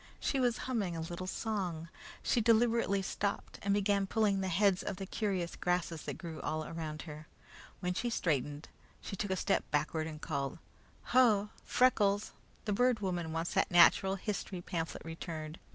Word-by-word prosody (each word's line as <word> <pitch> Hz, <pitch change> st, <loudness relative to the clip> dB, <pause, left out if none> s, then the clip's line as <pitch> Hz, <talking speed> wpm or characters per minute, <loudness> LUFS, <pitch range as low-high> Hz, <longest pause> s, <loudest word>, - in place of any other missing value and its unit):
She 275 Hz, -, 0 dB
was 245 Hz, -2 st, +2 dB
humming 205 Hz, -10 st, -1 dB
a -, -, -3 dB
little 175 Hz, +3 st, -5 dB
song. 185 Hz, -7 st, -2 dB, 0.4 s
She 240 Hz, -, +2 dB
deliberately 225 Hz, -3 st, +3 dB
stopped 200 Hz, +1 st, -3 dB
and 200 Hz, -, 0 dB
began 200 Hz, -1 st, +2 dB
pulling 205 Hz, -2 st, +2 dB
the 190 Hz, -, -1 dB
heads 190 Hz, +1 st, +3 dB
of -, -, -3 dB
the 195 Hz, -, -5 dB
curious 190 Hz, -4 st, -2 dB
grasses 175 Hz, -3 st, -1 dB
that -, -, -4 dB
grew 165 Hz, -3 st, -7 dB
all 155 Hz, 0 st, -2 dB
around 155 Hz, -2 st, -5 dB
her. 155 Hz, -1 st, -9 dB, 0.5 s
When 180 Hz, -1 st, 0 dB
she 240 Hz, +6 st, -1 dB
straightened, 145 Hz, -, -1 dB, 0.3 s
she -, -, -6 dB
took 205 Hz, +1 st, -3 dB
a 190 Hz, -, +1 dB
step -, -, +1 dB
backward 155 Hz, +2 st, 0 dB
and 155 Hz, -1 st, -7 dB
called: 140 Hz, -3 st, -3 dB, 0.6 s
"Ho! 215 Hz, -5 st, +5 dB
Freckles, 210 Hz, -5 st, +3 dB, 0.3 s
the 210 Hz, -, 0 dB
Bird 245 Hz, +2 st, +3 dB
Woman 175 Hz, -4 st, -2 dB
wants 165 Hz, +1 st, -2 dB
that -, -, +2 dB
natural 190 Hz, +2 st, +6 dB
history 195 Hz, -1 st, -3 dB
pamphlet 170 Hz, -2 st, -4 dB
returned. 165 Hz, -1 st, -6 dB
185 Hz, 170 wpm, -33 LUFS, 165-205 Hz, 0.6 s, natural